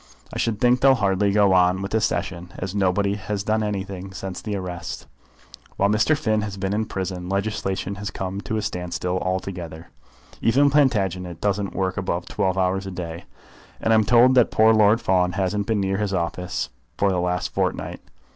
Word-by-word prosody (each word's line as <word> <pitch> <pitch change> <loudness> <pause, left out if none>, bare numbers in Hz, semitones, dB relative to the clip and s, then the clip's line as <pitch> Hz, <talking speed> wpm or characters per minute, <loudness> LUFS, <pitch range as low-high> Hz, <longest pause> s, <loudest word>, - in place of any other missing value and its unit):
I - - -4
should 110 -3 0
think 125 +1 +4
they'll 135 -1 +6
hardly 100 -3 +1
go 100 -1 +4
on 90 +1 +3
with 100 - -5
the 110 - +1
Session, 90 -3 -2
as 95 0 -4
nobody 100 0 +1
has 105 0 -3
done 110 +1 +1
anything 95 -2 -4
since 95 -1 -6
the 105 -2 -3
arrest. 90 -3 -5 0.7
While 100 - +3
Mr. 110 +9 +3
Finn 110 -5 +1
has 100 -2 -5
been 95 0 -2
in 110 +1 -1
prison 90 -2 -4
legislation 100 -1 -2
has 105 - -3
come 95 +1 -4
to 110 - -3
a 105 - -2
standstill 90 -2 -2
altogether. 90 -3 -4 0.5
Even 140 +5 +4
Plantagenet 95 - +1
doesn't 100 -1 -1
work 95 0 -1
above 90 -3 -2
twelve 95 0 -1
hours 95 +1 0
a - - -5
day, 85 -1 -6 0.5
and 115 - +2
I'm 110 -1 +5
told 120 +4 +5
that 125 -3 +5
poor 110 +1 +5
Lord 110 +1 +5
Fawn 90 -4 +1
hasn't 100 +1 -1
been 110 -2 +1
near 95 0 0
his 100 -2 -1
office 90 +1 -3 0.3
for 100 -1 +2
the 90 - 0
last 90 0 -1
fortnight. - - -2
95 Hz, 185 wpm, -23 LUFS, 90-105 Hz, 0.7 s, they'll